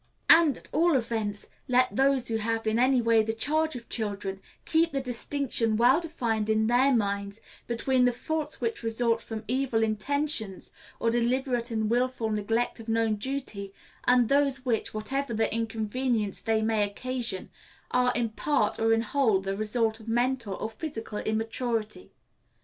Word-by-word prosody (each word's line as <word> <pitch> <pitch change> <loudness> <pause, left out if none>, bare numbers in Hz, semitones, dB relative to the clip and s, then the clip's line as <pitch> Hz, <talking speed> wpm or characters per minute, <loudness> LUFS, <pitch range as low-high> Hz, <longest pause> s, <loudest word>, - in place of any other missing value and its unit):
And, 320 -6 +6
at - - -12
all 330 +1 +3
events, 225 -4 -2 0.2
let 255 0 +2
those 270 -1 +2
who 225 - 0
have 225 +1 -2
in 220 +1 +1
any 255 -1 +3
way 230 -1 +4
the 220 +1 -2
charge 310 +6 0
of 235 -2 -8
children 200 -3 -3 0.2
keep 330 +1 +2
the 275 - 0
distinction 245 -3 -1
well 255 +7 +5
defined 230 -10 -2
in 220 0 +2
their 250 +4 +4
minds 200 -3 -1 0.3
between 250 +2 +2
the 245 - +4
faults 305 +5 -3
which 230 -2 -2
result 230 0 +1
from 225 -1 -6
evil 250 -2 +1
intentions, 220 -1 -1 0.3
or 230 - +1
deliberate 245 +1 0
and 220 -2 -1
willful 240 -1 0
neglect 225 +4 -1
of 225 0 -9
known 225 -1 +1
duty, 210 -5 -5 0.3
and 245 -2 +4
those 275 -1 +2
which, 230 -3 0
whatever 235 +3 -3
the 220 +1 +1
inconvenience 225 -1 -1
they 220 -1 +1
may 220 -1 +1
occasion, 235 0 -3 0.4
are 250 0 +3
in 235 -1 0
part 220 0 0
or 225 0 +3
in 225 0 +2
whole 230 -4 +2
the 195 0 -3
results 220 +1 0
of 220 - -14
mental 240 -3 0
or - - -4
physical 225 -6 -6
immaturity. 225 - -2
230 Hz, 160 wpm, -27 LUFS, 220-260 Hz, 0.4 s, And